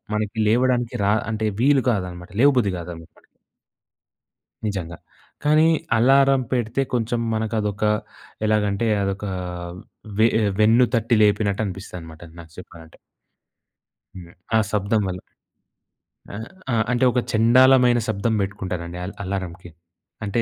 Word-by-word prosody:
మనకి 105 +1 -3
లేవడానికి 120 +1 +1
రా 100 - +3 0.2
అంటే, 110 0 -1
వీలు 140 -1 +4
కాదనమాట. 90 -4 -4
లేవబుద్ధి 125 -9 +3
గాదనమాట. 85 -1 -10 1.4
నిజంగా. 85 -5 -4 0.5
కానీ 155 +2 +4 0.3
అలారం 135 +2 +4
పెడితే 120 0 0
కొంచం 120 0 -1
మనకదొకా, 105 -1 -1 0.6
ఎలాగంటే, 105 +1 +1
అదొకా 100 0 -3 0.9
వే 110 - +6
ఆహ్, 105 - +1
వెన్ను 115 +4 +5
తట్టి 115 0 +1
లేపినట్టు 105 0 +1
అనిపిస్తుందనమాట 90 -5 -8 0.2
నాకు 80 -1 -13
చెప్పాలంటే. 80 -3 -14 1.2
హ్మ్. 90 -2 -11 0.2
ఆ - - +5
శబ్దం 105 +1 +1
వల్ల. 90 0 -4 1.1
ఆ! - - -6 0.4
ఆ! - - +2 0.2
అంటే, 125 +1 +1
ఒక 125 - +1
చెండాలమైన 125 +2 +5
శబ్దం 110 +1 -1
బెట్టుకుంటానండి 90 -3 -5
అల్ 100 - -7
అలారంకి. 95 -2 -5 0.5
అంటే 105 +3 0
105 Hz, 110 wpm, -22 LUFS, 95-120 Hz, 1.4 s, వే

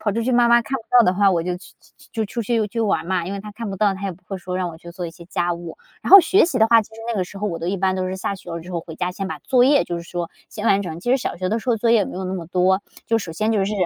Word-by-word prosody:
跑 210 - 0
出 230 - -1
去 255 +3 0
妈 240 -1 +4
妈 235 0 +6
看 270 +4 -3
不 235 - -9 0.2
到 230 - +6
的 180 - +3
话， 200 0 +4
我 170 -3 +1
就 180 0 -2
去 180 - -15
去 - - -24
去 - - -19
就 225 -2 -1
出 235 +3 -4
去 225 0 0
去 230 +3 -4
玩 200 -6 0
嘛， 185 -2 0
因 185 - -5
为 200 - -4
她 210 +1 -9
看 220 -1 -6
不 195 - -5
到， 200 0 +2
她 190 - -9
也 195 -2 -2
不 175 - -19
会 195 - -4
说 180 0 -5
让 185 -1 -1
我 160 - -9
去 170 +1 -11
做 175 0 -5
一 - - -7
些 170 +1 -14
家 175 -1 -1
务。 170 - -9 0.2
然 - - -4
后 395 - +13
学 365 +5 +4
习 315 -7 -1
的 220 - +5
话， 230 0 +5
其 - - -16
实 225 - -11
那 235 - -2
个 185 - 0
时 195 +2 -11
候 210 - -2
我 170 -5 -3
都 165 - -5
一 195 - -1
般 190 0 +1
都 185 0 -2
是 185 - -4
下 195 +1 -3
学 190 - -11
了 170 0 -4
之 175 +3 -11
后 170 - -2
回 160 -1 -10
家 180 0 -2
先 195 0 -4
把 - - -5
作 250 -2 +3
业 280 +2 +4
就 175 - -4
是 170 - -6
说 170 0 -4 0.2
先 215 +1 -5
完 200 -2 +3
成， 165 -3 -6
其 240 - -3
实 260 - +5
小 260 - -4
学 185 +1 -2
的 225 - 0
时 250 - -2
候 230 - +2
作 230 +2 +1
业 230 - +6
也 - - +2
没 - - -7
有 190 - -4
那 185 +1 -3
么 175 - -5
多， 185 +3 +2 0.2
就 225 - +2
首 190 -6 -6
先 215 +6 0
就 205 -3 +2
是 200 - -2
195 Hz, 410 characters per minute, -21 LUFS, 180-225 Hz, 0.2 s, 后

